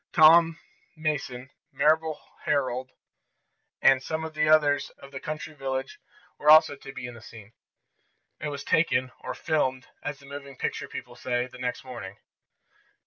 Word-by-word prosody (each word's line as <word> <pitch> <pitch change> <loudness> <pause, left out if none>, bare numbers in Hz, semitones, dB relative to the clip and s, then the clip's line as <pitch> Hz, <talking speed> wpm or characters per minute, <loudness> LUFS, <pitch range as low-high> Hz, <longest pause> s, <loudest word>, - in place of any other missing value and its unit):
Tom 165 +1 +7 0.4
Mason, 140 -5 -3 0.2
Mabel 155 +3 +2 0.3
Herold 130 -3 0 0.9
and 135 -1 +6
some 160 +3 -3
others 155 -2 +3
of 140 - -13
the 135 - -6
country 155 +1 -5
village 135 -2 -4 0.4
were 150 - +2
also 155 -2 +8
to 135 - -10
be 125 -2 -7
in 125 - -7
the 120 - -12
scene. 115 -1 -13 0.9
It 150 - -3
was 145 -1 -5
taken, 130 -5 +2
or - - -5
"filmed," 130 -5 -1
as 145 -1 -4
the 140 - -17
moving 140 -1 -9
picture - - -3
people - - -8
say, 125 -1 -1
the 125 0 -13
next 125 -1 -3
morning. 120 -7 -8
140 Hz, 145 wpm, -27 LUFS, 130-155 Hz, 0.9 s, also